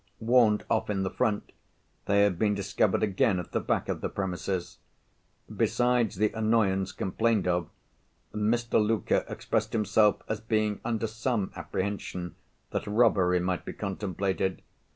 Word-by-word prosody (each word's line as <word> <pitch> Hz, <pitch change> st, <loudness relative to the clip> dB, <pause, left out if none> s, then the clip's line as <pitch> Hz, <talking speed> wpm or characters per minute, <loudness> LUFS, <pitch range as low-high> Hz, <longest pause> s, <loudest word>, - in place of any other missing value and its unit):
Warned 115 Hz, -2 st, +3 dB
off 110 Hz, -1 st, 0 dB
in 100 Hz, -2 st, 0 dB
the 95 Hz, -, -2 dB
front, 110 Hz, -5 st, -1 dB, 0.5 s
they 100 Hz, 0 st, +4 dB
had 95 Hz, -4 st, +1 dB
been 105 Hz, -1 st, +2 dB
discovered 100 Hz, +1 st, +1 dB
again 100 Hz, -1 st, +2 dB
at 90 Hz, -, -6 dB
the -, -, 0 dB
back -, -, -1 dB
of -, -, -3 dB
the -, -, -2 dB
premises. 95 Hz, -1 st, -3 dB, 0.8 s
Besides 120 Hz, -3 st, +2 dB
the 105 Hz, +3 st, +1 dB
annoyance 110 Hz, -4 st, +1 dB
complained 110 Hz, +1 st, 0 dB
of, 90 Hz, -2 st, 0 dB, 0.6 s
Mr. 110 Hz, +1 st, +1 dB
Luker 110 Hz, 0 st, +1 dB
expressed 110 Hz, -1 st, -2 dB
himself 105 Hz, -1 st, +3 dB
as 110 Hz, -, -3 dB
being 110 Hz, -2 st, 0 dB
under 115 Hz, -1 st, -1 dB
some 110 Hz, -2 st, -2 dB
apprehension 90 Hz, 0 st, -4 dB, 0.4 s
that -, -, -3 dB
robbery 105 Hz, -5 st, +3 dB
might 90 Hz, 0 st, -1 dB
be -, -, -6 dB
contemplated. 95 Hz, -1 st, -2 dB
105 Hz, 140 wpm, -28 LUFS, 95-110 Hz, 0.8 s, they